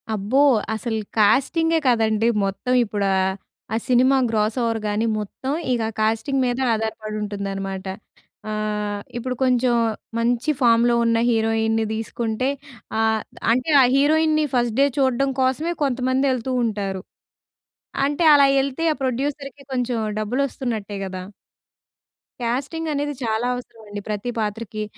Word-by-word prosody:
అబ్బో! 210 +7 0 0.4
అసలు 220 0 -3 0.2
కాస్టింగే 325 +10 +3
కాదండీ 225 -2 +2 0.2
మొత్తం 200 +6 -2
ఇప్పుడు 205 -2 -2
ఆహ్, 190 0 +1 0.4
ఆ - - +1
సినిమా 255 +2 +4
గ్రాస్‌ఓవర్‌గాని 220 -1 0
మొత్తం, 215 +6 -5 0.2
ఇక 235 -2 0 0.2
కాస్టింగ్ 225 +5 +1
మీద 245 0 -1 0.2
ఆధారపడి 215 -1 -3
ఉంటుందనమాట. 195 -2 -4 0.7
ఆహ్, 210 -1 -2 0.2
ఇప్పుడు 250 +1 -3
కొంచెం 250 -1 +2 0.5
మంచి 240 +5 +1
ఫామ్‌లో 235 0 +4
ఉన్న 230 0 +3
హీరోయిన్‌ని 225 -1 +1
తీసుకుంటే 225 +3 -2 0.5
ఆహ్ 220 -1 +2 0.3
,అంటే 255 +6 0
ఆ - - +7
హీరోయిన్‌ని 310 +2 +3
ఫస్ట్ 240 -1 +1
డే 280 - +6
చూడడం 265 +1 +2
కోసమే 280 +7 +1
కొంతమంది 260 0 +1
ఎళ్తూ 255 +1 -3
ఉంటారు. 200 -3 -3 1.0
అంటే, 290 +4 0
అలా 280 -1 +7
ఎళ్తే 275 +4 -2
ఆ - - +2
ప్రొడ్యూసర్‌కి 275 +2 -3
కొంచెం 250 -1 -1 0.2
డబ్బులు 225 +6 -1
వస్తున్నట్టే 220 -6 -4
కదా! 185 -1 -6 1.2
కాస్టింగ్ 275 +7 -2
అనేది 290 +1 -2
చాలా 225 +1 0
అవసరమండి. 220 -4 -8
ప్రతి 210 +3 -2
పాత్రకి 215 0 -3
235 Hz, 120 wpm, -22 LUFS, 215-260 Hz, 1.2 s, ఆ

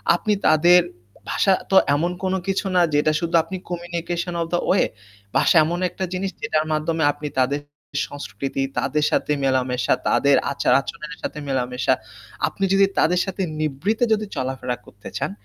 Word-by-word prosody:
আপনি 210 +4 0
তাদের 175 +3 +6 0.5
ভাষা 195 - +3 0.2
তো - - +3 0.2
এমন 170 +4 0
কোনো 190 0 +1
কিছু 195 +1 0
না 180 - +5
যেটা 150 +1 +3
শুধু 170 0 -1
আপনি 185 +3 -6
Communication 175 0 -3
of 165 - -2
the 175 - +3
way 190 - +4 0.5
ভাষা 140 +5 +4
এমন 175 +2 -2
একটা 190 +2 -6
জিনিস 190 +1 -2
যেটার 155 -9 0
মাধ্যমে 155 +1 0
আপনি 150 +1 -7
তাদের 140 +3 +1 0.5
সংস্কৃতি, 135 +2 -4 0.2
তাদের 150 +2 0
সাথে - - 0
মেলামেশা, 130 -2 +1
তাদের 140 0 +4 0.2
আচার-আচরণের 150 +3 0
সাথে 150 - -4
মেলামেশা, 125 -2 0 0.5
আপনি 195 - -5
যদি 195 0 +6
তাদের 180 +2 +3
সাথে 195 0 -3 0.2
নিভৃতে 155 - -1
যদি 215 0 -1
চলাফেরা 130 -1 -2
করতে 100 - -12
চান, - - -2
155 Hz, 155 wpm, -22 LUFS, 135-180 Hz, 0.5 s, তাদের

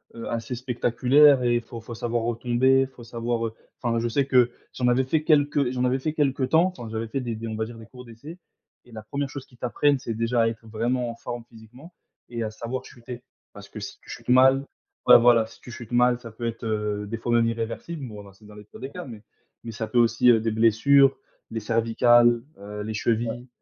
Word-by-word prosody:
heu, 115 - -7
assez 115 +2 -4
spectaculaires 125 +3 +3
et 120 -1 +2
il 120 - +1
faut 115 -1 -10
faut 115 +1 -9
savoir 120 0 -2
retomber, 125 +3 +2
faut 130 -2 -14
savoir, 115 0 -2
heu 110 - -8 0.3
enfin, 115 -2 0
je 120 - -1
sais 135 +4 +1
que 125 -2 +4 0.2
j'en 125 - -1
avais 125 +2 +3
fait 150 +4 0
quelques 145 -4 +2
j'en 125 0 -1
avais 125 +1 +1
fait 155 +3 -2
quelque 140 -3 0
temps, 165 +7 +3
enfin, 120 - -7
j'avais 115 0 -3
fait 125 +5 -3
des 120 -2 -4
des 115 +1 -6
on 110 - -4
va 110 0 -2
dire 115 +1 -10
des 110 - -12
cours 125 -1 -13
d'essai 125 +9 -11 0.5
et 120 - -19
la 110 - -8
1re 140 +6 -4
chose 135 -1 -8
qu'ils 125 - -22
t'apprennent, 140 +4 +1
c'est 115 -3 -5
déjà 115 +1 0
à - - +2
être 115 0 -6
vraiment 120 +3 -1
en 115 - -6
forme 120 0 -7
physiquement 125 +9 -15 0.4
et 120 -1 -4
à 110 - -4
savoir 120 +4 -6
chuter, 120 0 -10 0.3
parce - - -12
que - - -9
si - - -8
tu - - -19
chutes - - -9
mal 130 +2 +5 0.4
ouais, - - +10
voilà, 115 -2 +4
si 115 - -17
tu 125 - -11
chutes 120 0 -10
mal, 125 0 +3
ça 115 - -10
peut 115 +2 -7
être, 115 0 -4
heu, 105 -2 -2
des 115 +3 -4
fois 120 +1 -2
même 115 -1 +3
irréversible, 115 +6 -4
bon 105 -3 -9
alors, 100 -1 -15
c'est 105 - -20
dans 105 - -14
les 105 - -11
pires - - -14
des 135 +2 -7
cas, 180 -1 -7
mais 110 -4 -11 0.4
mais 115 - -6
ça 110 0 -5
peut 125 - -2
aussi 115 +1 +2
des 115 +1 -1
blessures, 130 +5 +4 0.3
les 115 - -3
cervicales, 115 +1 +3 0.2
heu, 105 +1 -7
les 110 - -4
chevilles, 115 +3 -1
120 Hz, 240 wpm, -25 LUFS, 115-130 Hz, 0.5 s, ouais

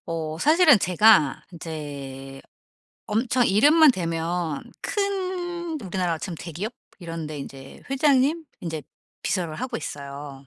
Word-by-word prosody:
어 160 -1 -3
사실은 310 - +6
제가 185 -5 +4
인제 140 -5 -7 0.6
엄청 235 +3 +2
이름만 295 +10 +6
대면 165 - -2 0.2
큰 365 -4 -2
우리나라로 180 -5 -2
치면 175 0 -5
대기업 180 +7 -5 0.3
이런 165 -3 -6
데 150 -1 -6
인제 135 -1 -10
회장님 285 +3 +3 0.2
인제 160 -3 -4 0.4
비서를 170 -5 -1
하고 255 0 -3
있어요. 140 -2 -7
175 Hz, 250 characters per minute, -24 LUFS, -, 0.6 s, 사실은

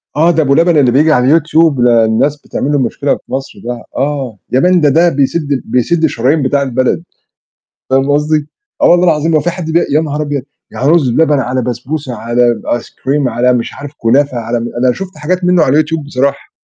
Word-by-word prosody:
آه 165 +3 +3
ده 160 - +1
أبو 140 0 +2
لبن 170 -1 +3
اللي 130 -4 +3
بييجي 150 +5 +3
على 140 +4 +4
الYouTube، 155 -3 +1
ده 115 -2 +4
الناس 140 +7 0
بتعمل 145 - -3
له 145 - +1
مشكلة 135 +3 -1
في - - -17
مصر 135 +1 -5
ده. 120 -1 -5
آه، 135 -6 -2
يا 130 - +2
man 180 0 +3
ده 145 - +4
ده 170 +5 +3
بيسد 145 +1 -1
ال 135 - 0
بيسد 160 +7 0
الشرايين 145 +1 +1
بتاع 140 +2 +1
البلد، 130 +4 -1 0.9
فاهم 135 +1 +2
قصدي؟ 150 +1 0 0.3
آه - - +6
والله 175 +1 +4
العظيم 160 -1 +1
هو 155 - +4
في 175 - -1
حد 170 -2 -6
بي 170 +2 +2
يا 150 - +3
نهار 150 -1 -3
أبيض! 145 -3 -3 0.3
يعني 135 +4 -1
رز 160 -7 +3
بلبن 150 +3 +2
على 125 0 -1
بسبوسة 125 +3 -4
على 120 +2 +1
ب - - -12
Ice - - -14
cream 140 0 -2
على 125 +2 +1
مش 120 -2 -2
عارف 145 -1 -8
كنافة 130 +3 +1
على 115 +1 -2
م 120 - -4 0.2
أنا 125 - +4
شُفت 190 +2 -8
حاجات 180 +5 -2
منه 180 -2 +3
على 140 +1 +2
YouTube 155 0 -4
بصراحة. 140 0 -2
145 Hz, 220 wpm, -13 LUFS, 125-155 Hz, 0.9 s, آه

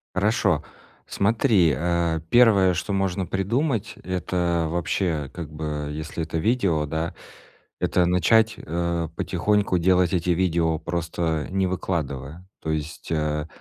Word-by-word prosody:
Хорошо. 100 -5 +2 0.4
Смотри, 100 - +3
э, 85 +1 0
первое, 105 -6 +5
что 95 +3 -2
можно 95 -1 0
придумать,- 110 - -1
это 90 -2 -1
вообще, 85 -3 -1
как 85 -3 -7
бы, 75 -1 -4
если 80 +2 -4
это 80 +1 -3
видео, 95 -6 +1
да, 80 +3 -3 0.7
это 90 - +2
начать, 110 +5 +3
э, 85 0 -2
потихоньку 100 0 +1
делать 90 +1 +3
эти 90 0 0
видео, 85 -2 +1
просто 80 -1 -2
не 95 0 +1
выкладывая. 80 -3 -3 0.2
То 80 - -3
есть, 80 +2 -4
э, 75 -1 -1
85 Hz, 125 wpm, -24 LUFS, 80-95 Hz, 0.7 s, первое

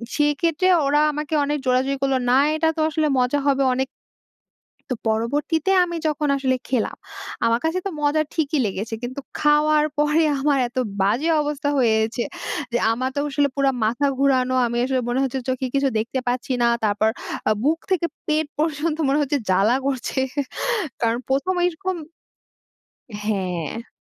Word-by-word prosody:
সেই 295 0 +3
ক্ষেত্রে 335 +2 +2 0.2
ওরা 295 +1 +3
আমাকে 300 +1 -4
অনেক 295 +1 -1
জোরাজুরি 260 +2 +1
করল, 270 -1 +2 0.2
না - - +5 0.2
এটা 320 +1 +2
তো 315 - +1
আসলে 310 0 0
মজা 250 +3 +1
হবে 275 -1 +3
অনেক। 265 +1 0 1.0
তো - - +1
পরবর্তীতে 290 - 0
আমি 345 -1 -4
যখন 300 -1 -1
আসলে 260 -1 +1
খেলাম, 250 -3 -1 0.5
আমার 230 +1 +2
কাছে 325 +3 +1
তো 390 - 0
মজা 295 +1 +2
ঠিকই 310 -1 0
লেগেছে, 205 +3 -4
কিন্তু 255 +3 -5 0.2
খাওয়ার 300 0 +4
পরে 300 +2 +3 0.2
আমার 285 -1 +2
এত 245 - -27 0.2
বাজে 230 +12 +2
অবস্থা 290 -1 -2
হয়েছে 220 0 +2 0.5
যে 240 - +2
আমার 255 +3 -2
তো - - -3
আসলে 285 0 +2
পুরা 275 -1 +3
মাথা 240 +6 +1
ঘুরানো। 255 -2 +2
আমি 235 0 -3
আসলে 260 0 0
মনে 245 +2 0
হচ্ছে 265 0 -2
চোখে 260 0 -1
কিছু 275 0 +2
দেখতে 235 +4 -2
পাচ্ছি 250 +1 -1
না। - - +4 0.2
তারপর 210 +1 +2 0.4
আ - - +3
বুক 315 +4 +2
থেকে 345 -2 +2 0.2
পেট 310 0 +1
পর্যন্ত 310 0 0
মনে 280 +2 +2
হচ্ছে 290 0 0
জ্বালা 195 +5 +3
করছে 265 -1 -2 0.8
কারণ 230 0 +1
১ম 280 +8 +1
এইরকম 365 +2 -1 1.3
হ্যাঁ। 190 - -3
275 Hz, 160 wpm, -22 LUFS, 245-300 Hz, 1.3 s, না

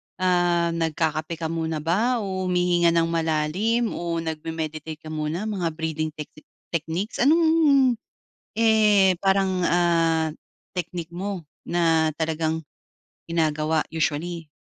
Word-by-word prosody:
Ah, 175 -2 +2
nagkakape 160 0 -1
ka 160 0 -4
muna 160 -2 -2
ba 220 +7 +1
o 185 -1 -3
humihinga 175 -1 +2
ng 165 - +4
malalim 165 +9 0
o 170 -1 -3
nagme-meditate 160 -1 -5
ka 155 - -8
muna, 155 +5 -2
mga 200 -6 -2
breathing 160 -1 -2
techsi 150 0 -9 0.3
techniques? 170 +5 -3
Anong, 315 +6 +4 1.2
eh, 210 -4 +5
parang, 190 -2 +2
ah, 165 -2 +2 0.4
technique 175 -1 -5
mo 185 -4 -4 0.2
na 165 -2 +2
talagang 160 0 -1 0.7
ginagawa 155 -1 +1
usually? 165 +1 -2
165 Hz, 110 wpm, -24 LUFS, 160-185 Hz, 1.2 s, eh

